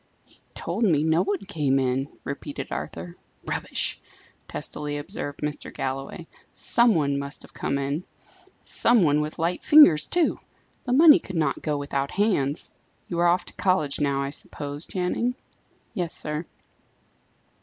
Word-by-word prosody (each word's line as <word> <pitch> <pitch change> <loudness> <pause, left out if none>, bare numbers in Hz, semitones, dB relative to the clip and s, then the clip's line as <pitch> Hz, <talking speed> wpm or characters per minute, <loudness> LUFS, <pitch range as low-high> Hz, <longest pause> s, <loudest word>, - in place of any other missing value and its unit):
"He - - -28 0.2
told 190 +8 -2
me 160 -8 +3
no 160 +2 +3
one 200 0 -2
came 150 -8 0
in," 130 +1 0
repeated - - -6
Arthur. 85 +1 -6 0.3
"Rubbish!" - - -2 0.5
testily 145 -1 -3
observed 145 0 -6
Mr. 150 0 -4
Galloway. 135 +6 -4 0.3
"Some 235 -1 +4
one 140 -3 +1
must 140 +1 -6
have - - -16
come 140 - -2
in; 140 +4 -2 0.6
some 235 -4 +4
one 150 -1 +3
with 150 +1 -4
light 170 +1 -1
fingers, 235 - +7
too! 345 -3 +1 0.5
the 245 - -2
money 300 +3 +8
could 185 - -9
not 150 -4 0
go 150 -2 -1
without 140 -1 -2
hands. 175 -9 0 0.4
You 170 - -2
are 175 - +4
off 175 +1 +2
to - - -10
college 185 -7 0
now, 140 -1 +1
I 140 - -3
suppose, 145 +1 -5
Channing?" 200 +7 -1 0.6
"Yes, 175 -2 -3
sir." 150 +2 -4
150 Hz, 150 wpm, -25 LUFS, 140-185 Hz, 0.6 s, money